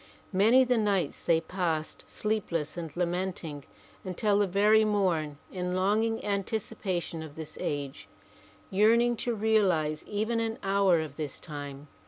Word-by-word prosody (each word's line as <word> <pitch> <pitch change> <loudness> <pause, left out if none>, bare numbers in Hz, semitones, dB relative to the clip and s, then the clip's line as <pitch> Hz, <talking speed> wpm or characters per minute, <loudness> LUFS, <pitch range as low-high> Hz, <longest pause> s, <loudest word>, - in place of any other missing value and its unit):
Many 225 +7 +6
the 250 -2 +2
nights 195 -8 0
they 165 -1 +3
passed 165 -2 -3
sleep 215 -2 -2
less 155 -2 -2
and 170 -2 -5
lamenting 175 -5 -2 0.4
until 200 +2 +1
the 205 - +3
very 210 +4 +4
mom 180 -8 0
in 180 -1 -2
longing 215 +4 +1
anticipation 200 -4 -2
of 155 -2 -9
this 160 -2 -7
age, 140 -2 -4 0.6
yearning 230 +5 +4
to 240 -1 -1
realize 190 -9 +2
even 220 +3 -1
an 225 0 -2
hour 195 -3 +3
of 155 - -7
this 150 -4 -4
time. 145 -2 -7
190 Hz, 140 wpm, -29 LUFS, 160-215 Hz, 0.6 s, Many